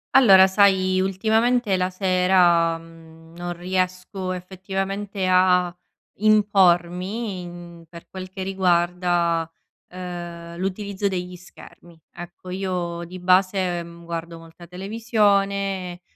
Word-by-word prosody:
Allora 195 -8 +8
sai 190 -1 +3
ultimamente 220 +3 +1
la 185 0 0
sera, 180 -3 +3
mhmm, 165 0 -16
non 175 0 -4
riesco 185 +1 -3
effettivamente 195 +2 -4
a 180 -1 +3 0.4
impormi 180 -3 0
per 170 +1 -13
quel 185 -1 -8
che 190 0 -6
riguarda, 175 -3 +1 0.4
ehm, 175 -2 -8
l'utilizzo 195 +2 -3
degli 180 -1 -4
schermi. 175 -1 -16 0.2
Ecco 175 +1 -11
io 180 -2 -3
di 180 +2 -9
base, 185 0 +2
ehm, 170 0 -10
guardo 170 0 -6
molta 165 +1 -14
televisione, 195 -2 0
185 Hz, 100 wpm, -23 LUFS, 175-195 Hz, 0.4 s, Allora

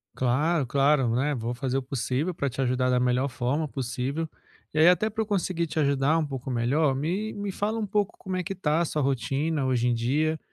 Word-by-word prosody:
Claro, 145 +5 +1
claro, 135 -2 +2
né, 145 +4 +1
vou 120 0 -3
fazer 130 +1 -2
o - - 0
possível 135 +5 -2
pra 140 -4 -1
te 130 - -10
ajudar 125 0 +1
da 125 0 +3
melhor 125 +2 +1
forma 130 +5 -1
possível. 135 +4 -3 0.5
Eh, 155 +3 +6
até 195 +5 +3
pra 220 +1 -3
eu - - -1
conseguir 180 -4 0
te 160 - -3
ajudar 140 +1 +2
um 160 - +1
pouco 135 -2 -6
melhor, 130 +4 +1
me 180 +10 -2
me 205 -1 -4
fala 210 +4 -2
um 220 - -1
pouco 205 0 0
como 190 -1 -5
é 185 - -1
que 195 +3 -4
tá 160 -3 +1
a - - +2
sua 155 -1 -1
rotina 135 +3 0
hoje 125 -2 +1
em 120 - +3
dia 150 +7 0
140 Hz, 220 wpm, -26 LUFS, 130-165 Hz, 0.5 s, Eh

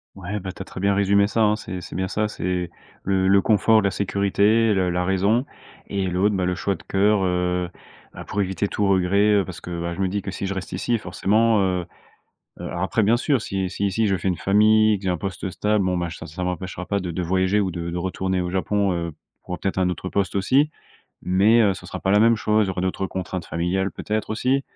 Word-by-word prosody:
Ouais, 100 +2 -5
ben, 95 -1 -6
tu 95 - -11
as - - -5
très - - -9
bien 100 +1 +2
résumé 100 0 +3
ça, 110 +3 0
hein, 105 0 +3
c'est 95 -4 -6
c'est - - -9
bien 95 +1 -1
ça, 105 +3 -1
c'est 90 -4 -3 0.3
le 95 -1 +1
le 100 +1 +5
confort 110 +1 +4
de - - -5
la 100 - +2
sécurité, 100 +3 +2
le 95 -2 +1
la 90 0 -1
raison 100 +7 +2 0.4
et 100 -1 -2
l'autre, 95 +4 +1
ben, 95 -1 0
le 90 0 0
choix 100 +2 -1
de - - -9
cœur, 100 +1 +2
heu, 90 -1 0 0.4
bah, - - -8
pour 100 - -2
éviter 95 +1 -1
tout 100 0 -1
regret, 100 +2 +3
heu 100 -2 +2
parce 90 -2 -9
que, 85 -1 -5
bah, 85 0 -3
je 95 - -5
me 95 - +2
dis 100 +1 -3
que 95 - -4
si 100 - -4
je 100 - -2
reste 95 - -6
ici 120 -1 0
forcément, 110 +3 +2
heu 90 -2 0 0.7
heu - - -7
alors 85 - -4
après, 110 +3 +1
bien 110 +4 +4
sûr 130 0 +1
si 95 -4 -2
si 100 +2 -2
ici 100 +3 +1
je 95 -1 +1
fais 95 - -3
une 90 - +1
famille 110 +2 +4
que - - -16
j'ai - - +1
un 90 - 0
poste 95 +2 -4
stable, 105 +1 0
bon 90 -1 0
ben, 85 -1 -2
j 80 - -8
ça - - -9
ça 80 +4 -6
m'empêchera 90 0 -4
pas 100 - 0
de 90 -2 -5
de 90 - -3
voyager 95 +3 +1
ou 95 -2 -1
de 85 0 -4
de 85 - -4
retourner 95 +1 -1
au 90 - -3
Japon, 100 +2 0
heu, 85 -1 -2 0.3
pour 90 - -4
peut-être 95 - -2
un 90 -1 +2
autre 90 +1 -4
poste, 100 -2 -1
aussi. 130 +10 +3 0.5
Mais, 100 +6 +4
heu, 100 -3 +3
ce 95 - -11
sera - - -6
pas 95 - 0
la 105 - +5
même 115 +1 +5
chose, 105 0 +2
il - - -5
y - - 0
aura 95 - -3
d'autres 95 +1 -1
contraintes 95 -1 -4
familiales, 90 +3 -1
peut-être 110 0 -3
aussi, 130 +5 +1
95 Hz, 255 wpm, -23 LUFS, 90-105 Hz, 0.7 s, le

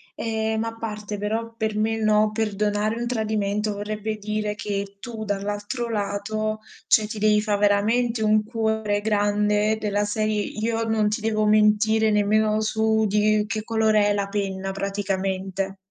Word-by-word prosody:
ehm, 220 0 -1
a 225 0 -4
parte 210 -2 -5
però 225 +3 -3
per 220 -1 -1
me 220 +1 +1
no, 215 -1 +3
perdonare 210 0 0
un 240 - -2
tradimento 215 -2 -1
vorrebbe 215 +1 -4
dire 210 0 -2
che 200 -1 -4
tu 225 0 -6
dall'altro 205 +4 -3
lato, 215 +1 -2 0.3
cioè 215 -1 +4
ti 220 0 -6
devi 210 0 +3
fa' 210 -1 0
veramente 220 +3 +2
un 215 0 +3
cuore 220 -2 -1
grande, 210 0 +1
della 205 -1 0
serie 215 0 0
io 225 +2 -2
non 220 -2 +1
ti 215 +1 -2
devo 215 -1 +1
mentire 215 +1 +4
nemmeno 215 +1 +2
su 220 0 +1
di 210 +1 +2
che 215 +1 -3
colore 220 -2 +2
è - - +2
la 200 -1 -1
penna, 195 -1 -3
praticamente. 195 -1 -2
215 Hz, 150 wpm, -24 LUFS, 205-220 Hz, 0.3 s, cioè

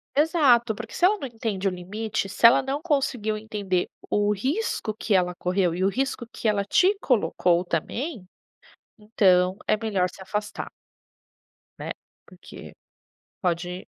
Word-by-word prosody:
Exato, 275 -7 +4
porque 225 +1 -8
se 355 - +4
ela 415 +3 +3
não 280 - -5
entende 225 -5 -4
o 195 - +3
limite, 200 +4 -4
se 225 +3 +5
ela 235 - +7
não 275 +3 -3
conseguiu 265 -9 0
entender 205 -4 -2 0.2
o 205 0 +2
risco 265 - -2
que 215 -1 -1
ela 180 -1 +2
correu, 180 -1 0
e 180 - -3
o 190 - +4
risco 260 +2 -2
que 230 - -6
ela 205 -2 +1
te 370 - +4
colocou 180 - +2
também, 215 - -3 0.7
então 190 -4 +3
é - - +3
melhor 205 -5 0
se - - -15
afastar. 210 +2 -4 1.1
Né? - - -4 0.3
Porque - - -13 0.7
pode 180 0 -2
210 Hz, 145 wpm, -25 LUFS, 185-245 Hz, 1.1 s, ela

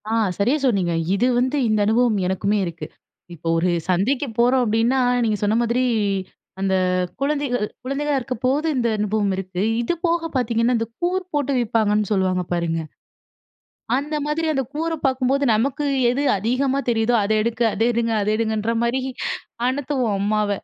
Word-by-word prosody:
ஆ. - - -1 0.2
சரியா 240 +9 +2
சொன்னீங்க. 195 -9 +1 0.2
இது 200 - +1
வந்து, 260 +4 0
இந்த 215 -1 +2
அனுபவம் 225 0 +2
எனக்குமே 195 +3 0
இருக்கு. 170 -2 -6 0.5
இப்போ 165 0 -8
ஒரு 175 +2 +1 0.2
சந்தைக்கு 240 +11 +1
போறோம் 250 +2 +4
அப்படின்னா, 230 +4 +2 0.2
நீங்க 215 -2 +1
சொன்ன 205 +1 +2
மாதிரி, 240 +2 +1 0.8
அந்த 195 0 0 0.5
குழந்தைகள் 280 -4 0 0.2
குழந்தைகளா 280 +2 -1
இருக்கப்போது 260 +4 -1
இந்த 240 -2 +1
அனுபவம் 210 -1 0
இருக்கு. 185 -1 -4 0.2
இது 240 - 0
போக 335 -1 0
பாத்தீங்கன்னா, 235 -1 +1
இந்த 225 0 -2
கூறு 365 +2 0
போட்டு 285 -2 0
விப்பாங்கன்னு 210 -3 +1
சொல்லுவாங்க, 185 -2 +1
பாருங்க. 165 -1 -1 1.2
அந்த 295 +3 -2
மாதிரி 310 +2 -1
அந்த 270 -1 0
கூற 325 +2 -1
பாக்கும்போது, 265 +1 +1
நமக்கு 270 +6 0 0.2
எது 260 +4 -1 0.2
அதிகமா 255 +6 0
தெரியுதோ, 225 +1 +1
"அதை 215 +2 +1
எடுக்க, 230 +1 -1
அதை 225 +3 +1
எடுங்க 230 0 0
அத 205 - -1
எடுங்கன்ற" 220 0 -1
மாரி 240 +3 0 0.7
அனத்துவோம், 260 -4 -1
அம்மாவ. 210 +1 +1
235 Hz, 150 wpm, -22 LUFS, 210-270 Hz, 1.2 s, போறோம்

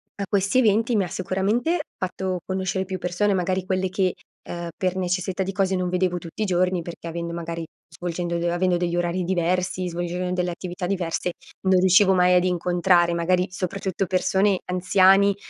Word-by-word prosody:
a 200 - -3
questi 200 +4 +2
eventi 225 0 +3
mi 200 - +3
ha 180 - -3
sicuramente 200 - 0 0.2
fatto 185 0 -3
conoscere 190 0 -1
più 190 0 -4
persone, 180 +4 0
magari 185 0 0
quelle 185 0 0
che, 190 -1 0 0.4
uhm, 170 0 -5
per 185 -1 0
necessità 185 +1 -1
di 190 - -3
cose 190 0 0
non 180 -1 -1
vedevo 180 0 0
tutti 175 +5 -5
i - - 0
giorni, 180 -1 +1
perché 170 0 -8
avendo 170 0 -4
magari 170 -1 -5 0.2
svolgendo 175 0 -3
d 170 - -3
avendo 175 +1 +1
degli 175 -1 -1
orari 175 +1 0
diversi, 180 +1 0
svolgendo 175 +1 -3
delle 180 -1 -1
attività 180 +1 -5
diverse, 180 -2 -1 0.4
non 190 -1 +5
riuscivo 190 +1 +5
mai 180 0 +4
ad 180 0 +4
incontrare, 175 -1 +2
magari 180 +2 +1
soprattutto 190 +1 -2
persone 190 +1 +2
anziani, 190 +2 +4
185 Hz, 175 wpm, -24 LUFS, 175-190 Hz, 0.4 s, non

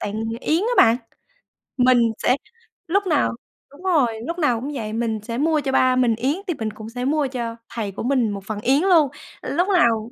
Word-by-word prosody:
tặng 210 +2 -3 0.2
yến 320 +2 +1
á 475 - 0
bạn. 230 0 +6 0.8
Mình 255 0 +5 0.2
sẽ 250 - +2 0.5
lúc 395 +3 +1
nào 300 -7 +1 0.4
đúng 285 +5 -16
rồi, 265 -12 +1
lúc 340 +1 -4
nào 250 -8 +2
cũng 280 +3 -4
vậy, 220 -5 -4
mình 225 -1 -1
sẽ 230 +1 -5
mua 310 +1 +2
cho 275 - -2
ba 255 -1 +3
mình 245 -3 +2
yến 260 +6 0
thì 350 - 0
mình 215 -1 -3
cũng 215 +1 -9
sẽ 245 +2 -4
mua 295 +1 +1
cho 240 -3 -4
thầy 215 -4 -4
của 195 - -6
mình 250 -3 +1
một 200 -1 -5
phần 215 -1 -4
yến 270 +7 +3
luôn, 345 -6 +5 0.3
lúc 355 +2 0
lào 235 - +2
255 Hz, 215 wpm, -22 LUFS, 225-300 Hz, 0.8 s, bạn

